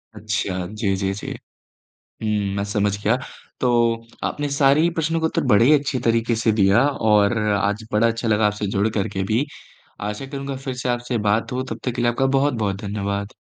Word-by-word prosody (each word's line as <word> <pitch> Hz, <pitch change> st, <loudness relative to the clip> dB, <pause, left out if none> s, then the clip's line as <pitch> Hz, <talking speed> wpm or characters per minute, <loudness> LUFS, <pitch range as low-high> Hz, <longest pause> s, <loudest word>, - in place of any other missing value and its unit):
अच्छा, 100 Hz, -4 st, -2 dB
जी, 105 Hz, -1 st, -1 dB
जी, 95 Hz, 0 st, -1 dB
जी। 100 Hz, -, -7 dB, 1.0 s
हुँ, 105 Hz, -2 st, 0 dB
मैं 100 Hz, -, -1 dB
समझ 100 Hz, 0 st, 0 dB
गया। 110 Hz, +4 st, +3 dB, 0.4 s
तो 125 Hz, -, +2 dB, 0.6 s
आपने 145 Hz, 0 st, -2 dB
सारे 140 Hz, +1 st, +4 dB
ही 170 Hz, +2 st, +3 dB
प्रश्नों 165 Hz, 0 st, 0 dB
के 160 Hz, -, +1 dB
उत्तर -, -, -1 dB
बड़े 105 Hz, +3 st, +6 dB
ही 140 Hz, -, +6 dB
अच्छे 140 Hz, -2 st, -2 dB
तरीके 115 Hz, 0 st, +2 dB
से 110 Hz, 0 st, +2 dB
दिया 100 Hz, +1 st, +4 dB
और 110 Hz, -4 st, +2 dB, 0.2 s
आज 105 Hz, +2 st, -1 dB
बड़ा 105 Hz, +2 st, +4 dB
अच्छा 115 Hz, 0 st, -2 dB
लगा 105 Hz, 0 st, +3 dB
आपसे 105 Hz, 0 st, -1 dB
जुड़ 100 Hz, +2 st, +1 dB
करके 95 Hz, -1 st, -1 dB
भी। 120 Hz, +6 st, +2 dB, 0.6 s
आशा 105 Hz, +5 st, -4 dB
करूँगा 140 Hz, 0 st, -5 dB
फिर 135 Hz, 0 st, -5 dB
से 125 Hz, -, -2 dB
आपसे 120 Hz, 0 st, -1 dB
बात 110 Hz, +2 st, +1 dB
हो 130 Hz, +1 st, -2 dB
तब -, -, -5 dB
तक 125 Hz, -, +1 dB
के 120 Hz, -, -1 dB
लिए 120 Hz, 0 st, +3 dB
आपका 135 Hz, +3 st, 0 dB
बहुत-बहुत 115 Hz, -8 st, 0 dB
धन्यवाद। 100 Hz, 0 st, -3 dB
110 Hz, 195 wpm, -22 LUFS, 100-130 Hz, 1.0 s, बड़े